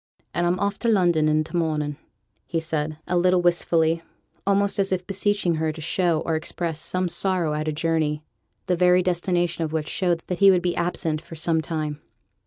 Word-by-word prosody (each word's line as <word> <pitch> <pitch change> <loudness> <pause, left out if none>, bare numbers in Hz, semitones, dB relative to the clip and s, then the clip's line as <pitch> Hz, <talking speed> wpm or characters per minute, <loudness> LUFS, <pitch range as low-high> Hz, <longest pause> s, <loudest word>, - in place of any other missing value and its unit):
'And 175 0 +1
I'm 175 +1 +1
off 200 0 -1
to 235 - -2
London 175 -8 +3
i' 155 0 +2
t' 160 - -9
morning,' 155 -3 0 0.6
added 160 -2 -1
he, 170 +3 -6
a - - +3
little 180 +1 +4
wistfully, 165 -1 +2 0.5
almost 200 0 +2
as 195 -1 +1
if 180 -1 -1
beseeching 195 -3 0
her 160 0 0
to 155 - -10
show 165 0 +1
or 165 - -2
express 160 0 -3
some 185 +3 0
sorrow 175 -2 0
at 155 +1 -2
a - - +1
journey, 155 -1 -1 0.4
the 180 - +1
very 180 +1 +4
destination 175 -1 0
of 155 -1 -4
which 155 -1 -1
showed 175 -3 0
that 180 - -4
he 200 -1 +7
would 180 -2 +4
be 175 -1 0
absent 170 -2 -1
for 165 - -11
some 160 0 0
time. 155 -2 -4
170 Hz, 195 wpm, -24 LUFS, 160-180 Hz, 0.6 s, he